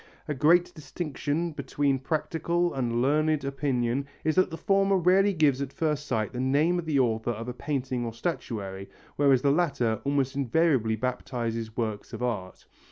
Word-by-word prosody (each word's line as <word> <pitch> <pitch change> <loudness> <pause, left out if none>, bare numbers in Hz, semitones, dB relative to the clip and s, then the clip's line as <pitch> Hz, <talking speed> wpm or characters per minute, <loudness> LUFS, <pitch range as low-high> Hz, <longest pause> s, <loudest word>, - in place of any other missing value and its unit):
A 150 - -1
great 170 +6 +3
distinction 155 +2 -3
between 145 -2 -1
practical 165 +4 -1
and 120 -2 0
learned 155 +1 +2
opinion 135 -2 -1 0.2
is 155 - +2
that 185 +2 +3
the 165 - -6
former 195 0 +2
rarely 190 +3 +4
gives 150 -6 +2
at 140 -1 -3
first 150 -2 -1
sight 110 -2 -1
the 125 - -4
name 145 +7 +2
of 170 - -5
the 150 -3 +1
author 115 -2 +1
of 115 0 -4
a 125 - -3
painting 130 -2 -2
or 115 - -3
statuary, 105 - -4 0.3
whereas 135 -3 +4
the 140 - +4
latter 140 -9 +1
almost 140 -2 0
invariably 135 -4 +2
baptizes 115 -2 -3
works 110 -3 -3
of - - -5
art. 105 -7 -4
140 Hz, 165 wpm, -27 LUFS, 120-155 Hz, 0.3 s, rarely